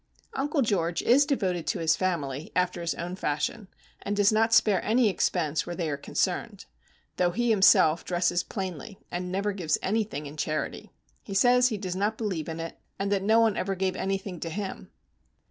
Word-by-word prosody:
Uncle 285 Hz, +1 st, 0 dB
George 175 Hz, -6 st, 0 dB
is 275 Hz, +4 st, +5 dB
devoted 185 Hz, -, -1 dB
to -, -, 0 dB
his 160 Hz, -1 st, +2 dB
family, 155 Hz, -6 st, -2 dB
after 180 Hz, -1 st, 0 dB
his 170 Hz, -1 st, -2 dB
own 175 Hz, +2 st, -5 dB
fashion, 155 Hz, +6 st, -2 dB, 0.3 s
and 205 Hz, -, -2 dB
does 205 Hz, 0 st, +4 dB
not 225 Hz, +1 st, +2 dB
spare 210 Hz, -4 st, +4 dB
any 230 Hz, +2 st, +3 dB
expense 160 Hz, -5 st, 0 dB
where 175 Hz, -, -4 dB
they 170 Hz, -2 st, -2 dB
are -, -, -1 dB
concerned; 140 Hz, -, -2 dB, 0.5 s
though 180 Hz, -1 st, +3 dB
he, 235 Hz, +6 st, 0 dB
himself, 170 Hz, -5 st, +5 dB
dresses 175 Hz, 0 st, +1 dB
plainly 190 Hz, 0 st, -6 dB
and 180 Hz, +1 st, -4 dB
never 200 Hz, +2 st, 0 dB
gives 175 Hz, -6 st, 0 dB
anything 205 Hz, -7 st, -1 dB
in 145 Hz, +2 st, -9 dB
charity. 155 Hz, +1 st, -3 dB, 0.3 s
He 195 Hz, -, -7 dB
says 245 Hz, +4 st, +5 dB
he 220 Hz, -4 st, -2 dB
does 185 Hz, -3 st, -4 dB
not 205 Hz, +3 st, 0 dB
believe 185 Hz, -8 st, -3 dB
in 160 Hz, 0 st, -5 dB
it, 165 Hz, 0 st, -6 dB, 0.2 s
that 200 Hz, 0 st, 0 dB
no 220 Hz, +3 st, +4 dB
one 225 Hz, -3 st, +3 dB
ever 195 Hz, +1 st, -1 dB
gave 190 Hz, 0 st, -1 dB
anything 195 Hz, -2 st, -3 dB
to 165 Hz, -, -4 dB
him. 195 Hz, +3 st, -5 dB
190 Hz, 185 wpm, -27 LUFS, 170-210 Hz, 0.5 s, is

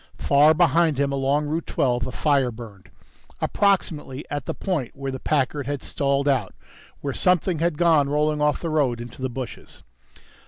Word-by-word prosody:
Far 150 Hz, +3 st, +4 dB
behind 160 Hz, -2 st, +3 dB
him 140 Hz, 0 st, +1 dB
along 140 Hz, +2 st, 0 dB
Route 160 Hz, +3 st, -3 dB
Twelve, 125 Hz, -2 st, 0 dB
a -, -, -5 dB
fire 140 Hz, -4 st, +1 dB
burned. 110 Hz, -5 st, -12 dB, 0.5 s
Approximately 155 Hz, -8 st, 0 dB
at 145 Hz, -3 st, -4 dB
the -, -, -3 dB
point 165 Hz, -, -3 dB
where 135 Hz, 0 st, -4 dB
the 130 Hz, -, -5 dB
Packard 140 Hz, -1 st, -1 dB
had 145 Hz, -1 st, -3 dB
stalled 140 Hz, 0 st, 0 dB
out, 130 Hz, -9 st, 0 dB, 0.5 s
where 140 Hz, -1 st, -3 dB
something 180 Hz, 0 st, +1 dB
had 170 Hz, -2 st, 0 dB
gone 160 Hz, -5 st, +3 dB
rolling 150 Hz, +1 st, 0 dB
off 150 Hz, -1 st, +1 dB
the 165 Hz, -, -3 dB
road 135 Hz, -6 st, +1 dB
into 120 Hz, +2 st, -9 dB
the 130 Hz, -, -1 dB
bushes.... 125 Hz, 0 st, -8 dB
145 Hz, 170 wpm, -23 LUFS, 130-155 Hz, 0.5 s, Far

